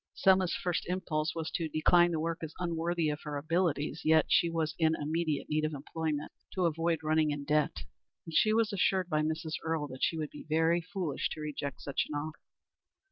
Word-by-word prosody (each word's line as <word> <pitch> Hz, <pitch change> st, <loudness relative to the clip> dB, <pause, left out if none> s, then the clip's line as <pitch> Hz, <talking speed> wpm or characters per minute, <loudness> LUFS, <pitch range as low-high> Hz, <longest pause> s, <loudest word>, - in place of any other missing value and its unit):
Selma's 190 Hz, -2 st, +4 dB
first 180 Hz, -3 st, -2 dB
impulse 170 Hz, -3 st, -1 dB
was 160 Hz, -1 st, -3 dB
to 165 Hz, -2 st, -2 dB
decline 175 Hz, +3 st, +4 dB
the 165 Hz, -2 st, -1 dB
work 165 Hz, +1 st, -2 dB
as 160 Hz, -1 st, -6 dB
unworthy 170 Hz, -1 st, -1 dB
of 150 Hz, 0 st, -3 dB
her 150 Hz, -1 st, -4 dB
abilities, 155 Hz, -1 st, 0 dB
yet 160 Hz, 0 st, +5 dB
she 170 Hz, -, +4 dB
was 165 Hz, -1 st, -1 dB
in 160 Hz, -1 st, +3 dB
immediate 155 Hz, 0 st, -1 dB
need 155 Hz, 0 st, 0 dB
of 155 Hz, 0 st, -1 dB
employment 150 Hz, +1 st, -3 dB, 0.2 s
to 185 Hz, -2 st, +2 dB
avoid 165 Hz, 0 st, +1 dB
running 155 Hz, 0 st, +2 dB
in 145 Hz, -1 st, -2 dB
debt 150 Hz, +1 st, +1 dB, 0.4 s
and 165 Hz, -, -8 dB
she 215 Hz, +7 st, +4 dB
was 220 Hz, -1 st, +2 dB
assured 190 Hz, -1 st, +1 dB
by 155 Hz, -2 st, +2 dB
Mrs. 160 Hz, +1 st, -2 dB
Earle 160 Hz, -2 st, -1 dB
that 130 Hz, 0 st, -9 dB
she 165 Hz, -, +1 dB
would 155 Hz, -2 st, -3 dB
be 150 Hz, -, -11 dB
very 165 Hz, +2 st, +3 dB
foolish 175 Hz, -4 st, -2 dB
to 155 Hz, -, -8 dB
reject 145 Hz, -2 st, -4 dB
such 140 Hz, -, -1 dB
an 150 Hz, -, -4 dB
offer. 155 Hz, +1 st, -5 dB
160 Hz, 200 wpm, -31 LUFS, 155-170 Hz, 0.4 s, yet